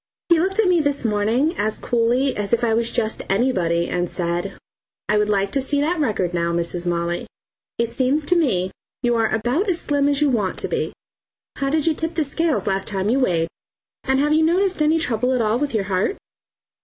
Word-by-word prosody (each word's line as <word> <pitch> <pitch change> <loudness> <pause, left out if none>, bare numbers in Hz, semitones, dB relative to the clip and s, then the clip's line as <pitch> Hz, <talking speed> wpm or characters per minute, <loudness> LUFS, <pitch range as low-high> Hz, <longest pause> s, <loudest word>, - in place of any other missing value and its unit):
He 340 -2 +5
looked 385 +4 0
at 440 -3 +3
me 355 -2 +4
this 285 -3 -1
morning 225 - +1
as 215 +1 0
coolly 245 +3 +1
as 205 +1 -3
if 235 +1 +2
I 230 -1 +2
was 230 +1 +1
just 220 -2 -2
anybody 185 -7 +1
and 175 -1 -1
said 175 +2 -3 0.5
"I 210 0 +2
would 210 0 +1
like 200 -1 +1
to 275 - 0
see 285 +2 0
that 320 +4 0
record 205 - 0
now, 170 -1 0
Mrs. 170 +1 -2
Molly. 170 0 -1 0.5
It 235 0 -1
seems 275 +3 +1
to 360 - +2
me 195 - +1 0.3
you 240 0 +2
are 225 -1 +2
about 245 - 0
as 345 -2 +1
slim 285 -2 +1
as 285 -1 +1
you 295 -2 +3
want 210 -6 -1
to - - -3
be. - - -2 0.7
How 275 - -1
did 305 +1 +1
you 325 - +3
tip 325 +2 -3
the 320 - +1
scales 315 +2 0
last 195 -1 -1
time 195 +1 -1
you 265 - +2
weighed, 170 -10 +1 0.6
and 265 0 +1
have 295 +2 +2
you 315 +1 +4
noticed 365 +2 +1
any 305 +2 +3
trouble 250 -4 0
at 250 - +1
all 220 +2 +1
with 285 -4 -2
your 210 - +1
heart? 190 - 0
240 Hz, 215 wpm, -21 LUFS, 195-295 Hz, 0.7 s, He